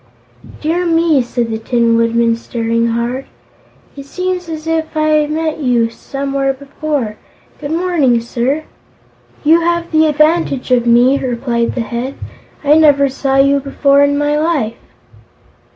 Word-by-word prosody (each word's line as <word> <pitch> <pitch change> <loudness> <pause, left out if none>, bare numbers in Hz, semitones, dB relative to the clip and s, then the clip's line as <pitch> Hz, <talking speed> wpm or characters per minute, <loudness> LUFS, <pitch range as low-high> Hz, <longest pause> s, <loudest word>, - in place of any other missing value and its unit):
"Dear 330 +4 0
me!" 330 -4 +2
said 240 -1 -3
the 220 - -3
Tin 230 0 +1
Woodman, 230 0 +2
staring 230 0 -2
hard. 235 +3 -2 0.7
"It 275 -1 -10
seems 365 +1 -3
as 315 -1 -6
if 320 -1 -2
I 310 0 +1
had 305 -1 +2
met 315 0 -2
you, 240 -5 +1
somewhere, 275 +2 -3
before. 275 -4 -4 0.4
Good 285 - -6
morning, 320 -7 +1
sir!" 245 +6 -2 0.8
"You 320 +3 +5
have 340 0 -1
the 315 0 +4
advantage 305 -3 +1
of 240 -1 +2
me," 245 +4 +4
replied 235 -2 -2
the 250 - -1
Head. 240 +4 -4 0.5
"I 295 +2 +4
never 280 -3 +4
saw 270 +1 -2
you 275 +1 +4
before 280 0 +2
in 285 0 +2
my 290 0 0
life." 300 -9 0
275 Hz, 145 wpm, -15 LUFS, 240-310 Hz, 0.8 s, You